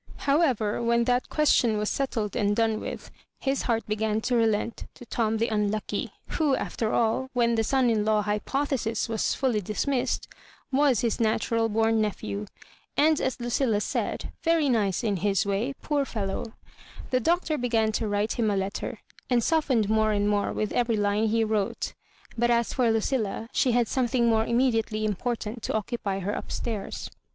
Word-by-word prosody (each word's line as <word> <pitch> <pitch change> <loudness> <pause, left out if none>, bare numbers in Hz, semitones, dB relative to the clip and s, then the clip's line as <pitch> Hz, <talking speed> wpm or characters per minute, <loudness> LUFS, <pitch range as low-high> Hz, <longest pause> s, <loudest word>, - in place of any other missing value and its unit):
How 285 +4 +4
ever, 225 -10 +1
when 235 0 +2
that 245 +1 +1
question 245 -7 +3
was 210 0 -1
settled 225 -6 -2
and 205 -3 +1
done 225 -1 +1
with, - - -7 0.3
his 270 0 0
heart 230 -2 0
began 215 0 0
to 245 - 0
relent 225 -1 0
to 245 - -12
Tom 225 -1 0
the 230 +1 0
un 210 -1 +1
lucky, 215 0 -3 0.2
who 300 -5 +1
after 225 -3 -2
afi, 235 +4 +1
when 235 -2 +2
the 225 -1 +2
son 260 +2 +2
in 220 -3 +2
law 215 0 +2
hypo 210 +7 -1
thesis 230 -6 -1
was 225 -1 0
fully 245 -6 +1
dismissed, 250 +6 -1 0.4
was 270 -4 +3
his 235 0 0
natural 225 0 +1
bom 225 +1 +2
nephew, 105 - -3 0.5
and, 310 +1 +4
as 260 - -1
LuciUa 240 -2 0
said, - - -3
very 330 -3 +2
nice 215 -3 +1
in 205 -4 0
his 195 +1 +1
way, 210 +7 -1
poor 290 -2 +1
fellow 200 -7 -3
1 225 - -11 0.6
The 255 - +3
Doctor 330 +3 +1
began 225 -3 +1
to 220 +1 -1
write 205 +3 -1
him 220 -2 +2
a 200 - +1
letter, 195 +1 -3 0.3
and 245 -2 +3
softened 265 -9 +2
more 215 0 +2
and 205 0 +1
more 205 -1 +1
with 215 - -2
every 235 -2 +1
Ime 205 +2 +2
he 225 +1 +2
wrote; 215 -2 -1 0.4
but 240 +1 +1
as 235 -1 +2
for 250 -3 +2
Lucilla, 225 -1 -1
she 250 - +2
had 240 -1 +3
something 245 -1 +1
more 225 -1 +2
immediately 225 -3 +1
Important 225 +2 -3
to - - -3
occu 220 +3 -2
py 195 -1 -1
her 205 +3 -2
up - - -6
stairs. 220 -5 -4
225 Hz, 185 wpm, -27 LUFS, 215-245 Hz, 0.6 s, How